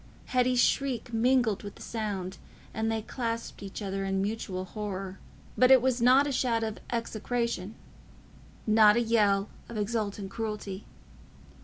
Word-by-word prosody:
Hetty's 250 Hz, -1 st, +2 dB
shriek 250 Hz, -3 st, +1 dB
mingled 235 Hz, -2 st, +2 dB
with 205 Hz, -, -8 dB
the -, -, -15 dB
sound, 200 Hz, -5 st, -4 dB, 0.3 s
and 220 Hz, 0 st, -1 dB
they 220 Hz, -1 st, -2 dB
clasped 230 Hz, -2 st, -4 dB
each 200 Hz, +1 st, -6 dB
other 195 Hz, 0 st, -2 dB
in 195 Hz, 0 st, 0 dB
mutual 195 Hz, -2 st, -3 dB
horror. 195 Hz, -2 st, -5 dB, 0.4 s
But 255 Hz, +1 st, +5 dB
it 265 Hz, -1 st, +9 dB
was 255 Hz, -1 st, 0 dB
not 255 Hz, +4 st, +6 dB
a 290 Hz, -, -1 dB
shout 235 Hz, -3 st, +1 dB
of 220 Hz, -1 st, -3 dB
execration—not 220 Hz, -1 st, -1 dB
a -, -, +3 dB
yell 210 Hz, -3 st, +2 dB, 0.2 s
of 235 Hz, -, -6 dB
exultant 205 Hz, -2 st, -2 dB
cruelty. 210 Hz, -3 st, -4 dB
220 Hz, 140 wpm, -29 LUFS, 200-235 Hz, 0.4 s, it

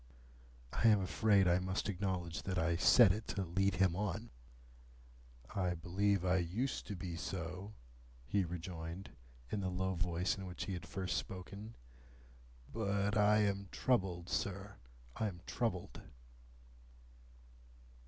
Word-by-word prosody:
(I 115 Hz, -, +3 dB
am 105 Hz, -2 st, +6 dB
afraid 95 Hz, +1 st, +3 dB
I 90 Hz, +1 st, +4 dB
must 95 Hz, +2 st, -2 dB
acknowledge 90 Hz, -4 st, -2 dB
that 95 Hz, -1 st, -3 dB
I 85 Hz, 0 st, +2 dB
said 100 Hz, +4 st, +7 dB
it 105 Hz, +3 st, -3 dB
to 100 Hz, -, -1 dB
lead 95 Hz, +2 st, +1 dB
him 90 Hz, -1 st, +3 dB
on.) 105 Hz, +3 st, -2 dB, 1.2 s
"I 90 Hz, -3 st, 0 dB
believe 95 Hz, +3 st, +1 dB
I 90 Hz, +1 st, +3 dB
used 100 Hz, +10 st, -1 dB
to 105 Hz, -, -4 dB
be 90 Hz, -2 st, -5 dB
so," 90 Hz, +4 st, -5 dB, 0.5 s
he 95 Hz, +8 st, +1 dB
rejoined, 85 Hz, +1 st, -6 dB, 0.4 s
in 105 Hz, -, 0 dB
the 95 Hz, -, -1 dB
low 95 Hz, +1 st, -1 dB
voice 90 Hz, +2 st, 0 dB
in 95 Hz, -, -5 dB
which 90 Hz, -, -5 dB
he 100 Hz, -, -3 dB
had 90 Hz, -1 st, -6 dB
first 95 Hz, -2 st, -2 dB
spoken; 100 Hz, +4 st, -6 dB, 1.0 s
"but 100 Hz, -2 st, 0 dB
I 105 Hz, 0 st, +5 dB
am 100 Hz, -1 st, -1 dB
troubled, 95 Hz, -9 st, +1 dB
sir, 100 Hz, +1 st, -3 dB, 0.4 s
I 110 Hz, -, +1 dB
am 90 Hz, -4 st, -7 dB
troubled." 95 Hz, -7 st, -2 dB
95 Hz, 135 wpm, -36 LUFS, 90-100 Hz, 1.2 s, said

